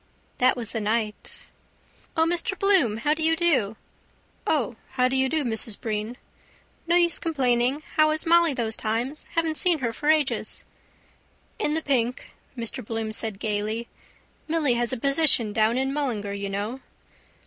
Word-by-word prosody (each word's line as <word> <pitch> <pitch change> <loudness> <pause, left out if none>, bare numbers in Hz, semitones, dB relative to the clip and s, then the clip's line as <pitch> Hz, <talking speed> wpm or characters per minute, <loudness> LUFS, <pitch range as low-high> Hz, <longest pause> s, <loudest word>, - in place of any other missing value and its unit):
That 255 +1 +4
was 230 -2 -4
the 225 - -3
night... 215 0 -3 0.7
—O, 320 - +4
Mr 345 +3 0
Bloom, 370 - +3
how 295 +6 +1
do 315 - -5
you 325 +1 +3
do? 295 - +2 0.7
—O, 245 -7 0 0.2
how 250 0 +3
do 260 - -1
you 265 0 +2
do, 315 0 0
Mrs 225 -3 -1
Breen? 220 +2 -3 0.7
—No 340 - +3
use 345 -1 +4
complaining. 260 -2 +1
How 310 0 +6
is 310 0 0
Molly 335 -3 +4
those 225 -3 0
times? 235 +7 -3
Haven't 325 -2 0
seen 355 -3 +4
her 235 -5 -2
for 295 +5 -2
ages. 305 -3 +1 0.9
—In 305 -8 0
the 320 - 0
pink, 250 -3 -1 0.2
Mr 235 +2 -3
Bloom 225 0 -3
said 215 -2 -2
gaily. 215 +3 -2 0.6
Milly 310 -5 +2
has 240 0 0
a 260 - -2
position 275 -5 +2
down 220 +3 +2
in 265 +1 0
Mullingar, 230 -9 -2
you 200 0 -4
know. 205 +6 -3
255 Hz, 160 wpm, -25 LUFS, 225-310 Hz, 0.9 s, How